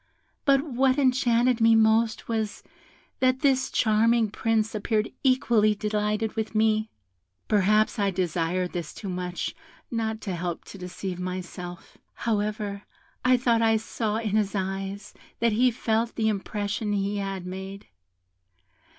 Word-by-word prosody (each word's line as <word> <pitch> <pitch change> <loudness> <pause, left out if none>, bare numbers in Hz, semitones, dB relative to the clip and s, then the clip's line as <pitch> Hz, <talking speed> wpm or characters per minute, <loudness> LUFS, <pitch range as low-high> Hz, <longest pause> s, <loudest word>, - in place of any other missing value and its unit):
But 275 -1 +4
what 265 -2 +1
enchanted 250 -3 +3
me 225 0 +6
most 220 0 +3
was, 220 -2 -2 0.6
that 255 0 +2
this 270 -3 +2
charming 225 0 +3
Prince 220 0 0
appeared 215 0 0
equally 235 -5 +3
delighted 210 +1 -1
with 220 0 -3
me; 215 0 +2 0.6
perhaps 215 +2 +3
I 200 -1 +2
desired 180 -1 -1
this 170 -3 -5
too 200 - -6
much 180 -1 -3 0.4
not 220 -2 -2
to 190 -3 -3
help 175 -1 -4
to 195 - -11
deceive 180 0 -5
myself. 180 -1 -6 0.2
However, 210 -2 -2 0.4
I 255 0 +5
thought 235 -2 +2
I 225 -1 +4
saw 220 -1 -2
in 225 -2 -2
his 210 -2 0
eyes 195 +1 -4 0.3
that 235 0 +3
he 245 +4 +4
felt 230 -1 -1
the 220 -1 +1
impression 205 +1 -2
he 200 0 -1
had 195 -2 -4
made. 190 +2 -7
215 Hz, 135 wpm, -26 LUFS, 195-230 Hz, 0.6 s, me